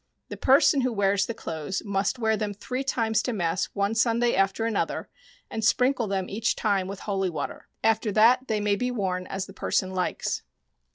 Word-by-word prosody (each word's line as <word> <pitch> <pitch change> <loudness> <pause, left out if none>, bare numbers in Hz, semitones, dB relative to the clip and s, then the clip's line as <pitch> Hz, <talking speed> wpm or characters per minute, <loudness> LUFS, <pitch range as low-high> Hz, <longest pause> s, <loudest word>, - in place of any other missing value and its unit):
The - - -5
person 270 +1 +4
who 255 0 0
wears 200 -2 +1
the 230 - -4
clothes 160 +1 -4
must 200 +5 0
wear 220 -2 +1
them 210 -1 -3
three 250 +6 -4
times 225 -5 +1
to 250 - -2
mass 175 -2 0
one 200 +1 +1
Sunday 235 +1 +2
after 195 +3 +1
another 225 -3 -1 0.4
and 220 - -5
sprinkle 250 +1 +2
them 190 -2 -1
each 225 +3 0
time 200 -4 0
with 195 0 -7
holy 195 -2 -1
water. 155 -4 -5 0.2
After 225 -1 +2
that 240 +5 +5
they 220 -2 0
may 205 -1 +1
be 250 +4 -1
worn 185 -6 -2
as 195 0 -3
the 195 - -12
person 185 -1 -1
likes. 180 -1 -2
210 Hz, 190 wpm, -26 LUFS, 195-230 Hz, 0.4 s, that